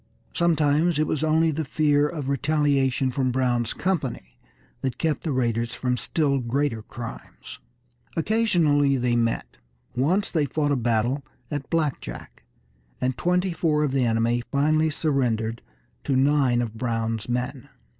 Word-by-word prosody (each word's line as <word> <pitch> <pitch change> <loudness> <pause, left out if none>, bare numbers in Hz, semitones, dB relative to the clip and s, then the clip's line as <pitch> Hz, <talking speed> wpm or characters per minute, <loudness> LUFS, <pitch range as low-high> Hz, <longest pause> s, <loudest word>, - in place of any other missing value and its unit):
Sometimes 160 -1 +2
it 155 - +2
was 155 0 -1
only 160 +1 +3
the 160 +1 -2
fear 150 0 +2
of 150 -5 -5
retaliation 140 -2 +1
from 130 0 0
Brown's 120 -2 0
company 140 - -2 0.5
that 130 -2 -2
kept 160 -2 0
the 160 - -1
raiders 115 -3 0
from 125 -1 0
still 140 +2 0
greater 125 -1 -1
crimes. 115 +1 -9 0.6
Occasionally 165 -9 +2
they 120 -1 +1
met; 115 -1 -1 0.4
once 170 +11 +1
they 155 -4 +1
fought 145 0 0
a - - +3
battle 120 +3 0 0.3
at 145 -2 -4
Black 155 -5 0
Jack, - - -9 0.6
and 125 0 0
twenty 180 +3 +1
four 155 -2 +1
of 145 - 0
the 135 -1 +1
enemy 115 +1 +1
finally 155 +3 +2
surrendered 120 -7 -1 0.4
to 135 - 0
nine 135 -2 +3
of 110 -2 -5
Brown's 115 -2 -2
men. 125 +1 -3
140 Hz, 145 wpm, -25 LUFS, 120-155 Hz, 0.6 s, only